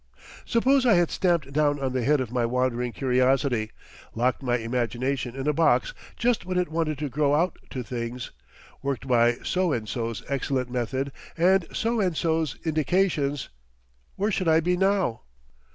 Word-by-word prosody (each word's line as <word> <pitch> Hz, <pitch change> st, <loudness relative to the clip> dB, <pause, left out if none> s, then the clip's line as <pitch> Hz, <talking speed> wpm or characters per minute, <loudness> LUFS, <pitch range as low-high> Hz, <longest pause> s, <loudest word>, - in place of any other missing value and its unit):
Suppose 260 Hz, +3 st, +3 dB
I 235 Hz, -6 st, +5 dB
had 175 Hz, -2 st, +2 dB
stamped 170 Hz, -7 st, 0 dB
down 145 Hz, -1 st, +2 dB
on 135 Hz, -2 st, -2 dB
the 130 Hz, -2 st, 0 dB
head 150 Hz, +3 st, +3 dB
of 120 Hz, -3 st, -4 dB
my 125 Hz, -1 st, 0 dB
wandering 125 Hz, 0 st, 0 dB
curiosity, 130 Hz, -2 st, +1 dB, 0.5 s
locked 125 Hz, +4 st, +1 dB
my 125 Hz, -2 st, +1 dB
imagination 120 Hz, +2 st, -2 dB
in 135 Hz, +1 st, -4 dB
a 150 Hz, -, +3 dB
box 165 Hz, -, +2 dB, 0.2 s
just 240 Hz, -1 st, +1 dB
when 185 Hz, 0 st, -3 dB
it 180 Hz, -2 st, 0 dB
wanted 160 Hz, -2 st, -1 dB
to 150 Hz, +1 st, -3 dB
grow 145 Hz, +1 st, +1 dB
out 175 Hz, +4 st, 0 dB
to 130 Hz, -3 st, -4 dB
things, 120 Hz, 0 st, -5 dB, 0.5 s
worked 135 Hz, -2 st, -3 dB
by 120 Hz, -1 st, +4 dB
so 185 Hz, -2 st, +1 dB
and 115 Hz, -6 st, -2 dB
so's 115 Hz, -2 st, -3 dB
excellent 135 Hz, -2 st, -1 dB
method 130 Hz, +3 st, -2 dB, 0.3 s
and 180 Hz, +1 st, +3 dB
so 230 Hz, +1 st, 0 dB
and 180 Hz, -5 st, 0 dB
so's 160 Hz, -7 st, 0 dB
indications, 155 Hz, -2 st, 0 dB, 0.7 s
where 205 Hz, +3 st, 0 dB
should 185 Hz, -3 st, -1 dB
I 160 Hz, 0 st, +5 dB
be 180 Hz, +2 st, +1 dB
now? 190 Hz, -, +1 dB
140 Hz, 170 wpm, -26 LUFS, 125-175 Hz, 0.7 s, I